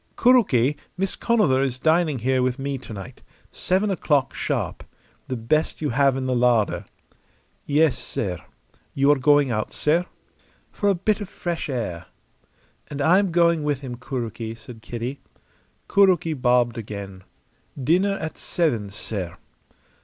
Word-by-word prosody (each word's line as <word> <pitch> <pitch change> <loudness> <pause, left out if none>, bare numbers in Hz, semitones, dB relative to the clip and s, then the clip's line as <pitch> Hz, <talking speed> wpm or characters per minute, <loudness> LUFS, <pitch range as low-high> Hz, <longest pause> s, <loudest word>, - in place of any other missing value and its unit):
"Kuroki, 150 - +4 0.2
Miss 195 0 -1
Conover 210 - +2
is 130 -2 -1
dining 160 0 +2
here 130 +2 +1
with 125 0 0
me 135 -1 -3
to 125 - -11
night. 100 -3 -9 0.3
Seven 195 +3 0
o'clock 150 -7 +1
sharp. - - -3 0.4
The 130 - -3
best 125 +7 0
you 150 -4 -1
have 135 +1 +3
in 130 - -3
the 130 -1 0
larder." 120 -3 +2 0.8
"Yes, 150 0 +3
sair. 90 -6 -4 0.5
You 140 +1 +4
are 145 - +3
going 145 -1 +4
out, 110 -2 -2
sair?" 165 +4 +1 0.6
"For 205 - 0
a 195 - +3
bit 210 +4 0
of 205 - -6
fresh 170 -3 -4
air." 110 - -4 0.8
"And 145 - -7
I 165 +7 +5
am 200 -3 0
going 170 -1 +3
with 145 -2 -1
him, 125 -3 -6
Kuroki," 115 -3 -5
said 115 0 -12
Kitty. 120 +5 -5 0.7
Kuroki 185 -5 +3
bobbed 125 -3 +2
again. 100 -3 -7 0.6
"Dinner 185 +9 +2
at 160 - -6
seven, 120 - -1
sair." 100 -3 -5
135 Hz, 145 wpm, -23 LUFS, 120-165 Hz, 0.8 s, I